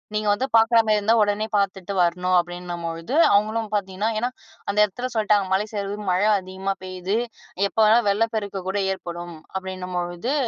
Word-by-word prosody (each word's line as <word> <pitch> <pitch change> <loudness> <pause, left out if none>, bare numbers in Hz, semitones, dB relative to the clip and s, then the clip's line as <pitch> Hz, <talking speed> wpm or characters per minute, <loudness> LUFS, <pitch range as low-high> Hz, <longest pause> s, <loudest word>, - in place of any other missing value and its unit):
நீங்க 215 0 -1
வந்து 250 +6 -1
பார்க்குறமாரி 225 -1 +4
இருந்தா 215 +2 +3
உடனே 205 +1 0
பார்த்துட்டு 195 -1 -1
வரணும்." 180 +1 +1
அப்படீன்னும்பொழுது, 175 - -4 0.2
அவுங்களும் 215 +1 +1
பார்த்தீங்கன்னா 200 +1 -1
ஏன்னா 245 +2 0 0.4
அந்த 200 - -8
இடத்துல 245 +6 -5
சொல்ட்டாங்க, 210 -3 +2
"மலை 200 +3 +1
சரிவு. 200 0 -3
மழை 185 +4 +2
அதிகமா 190 +1 -4
பெய்யுது. 185 +2 -2 0.5
எப்ப - - -4
வேணாலும் 220 0 +4
வெள்ளப்பெருக்கு 205 -2 -1
கூட 195 - -1 0.2
ஏற்படும்." 175 -2 -7 0.2
அப்படீன்னும்பொழுது 185 +3 -3
200 Hz, 145 wpm, -23 LUFS, 185-215 Hz, 0.5 s, பார்க்குறமாரி